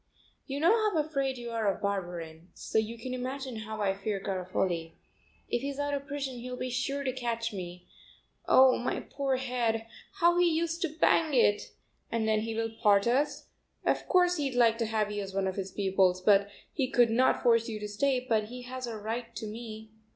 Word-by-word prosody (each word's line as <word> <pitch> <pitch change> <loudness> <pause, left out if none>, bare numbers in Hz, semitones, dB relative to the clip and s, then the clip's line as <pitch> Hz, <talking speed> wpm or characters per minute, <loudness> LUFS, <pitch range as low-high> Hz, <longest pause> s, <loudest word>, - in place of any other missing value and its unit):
"You 275 +1 -3
know 335 +5 +5
how 425 -5 +1
afraid 275 -4 0
you 240 -1 -6
are 220 -3 +1
of - - -7
Barberin, 175 -5 -4
so - - 0
you 220 +2 -3
can 255 +3 -5
imagine 260 0 -4
how 215 0 -5
I 195 -2 +2
fear 200 +1 -3
Garofoli. 180 -3 -2 0.5
If 240 - -1
he's 280 0 -4
out 285 0 -1
of 280 0 -3
prison 275 -3 -4
he'll 250 +1 -6
be 255 0 -3
sure 275 +3 -1
to 260 -2 -1
catch 235 -2 -2
me. 180 -2 -7 0.6
Oh, 260 0 +6
my 245 - -2
poor 275 -1 -2
head; 240 -3 -1 0.3
how 345 -2 +3
he 355 - +5
used 330 +1 -1
to 340 - +1
bang 315 -3 +3
it! 210 -4 +2 0.4
And 225 -1 0
then 215 -1 +3
he 225 +1 -3
will 225 0 -1
part 200 -3 +5
us; 265 +5 0 0.4
of - - +1
course 360 -1 +4
he'd 275 -4 -2
like 230 -2 +4
to 230 - 0
have 215 -1 0
you 205 0 -2
as 195 -1 -7
one 195 -1 +1
of 190 - -1
his 195 -1 -4
pupils, 190 -2 +2
but 200 +1 +4 0.2
he 265 -4 0
could 240 -3 +4
not 255 +3 +3
force 230 -1 +4
you 215 -1 -4
to 210 - -4
stay, 255 +4 0
but 220 -3 +2
he 250 +3 -8
has 255 0 -6
a 225 -2 -5
right 225 +3 -5
to - - -5
me. 220 0 -8
230 Hz, 210 wpm, -30 LUFS, 210-265 Hz, 0.6 s, Oh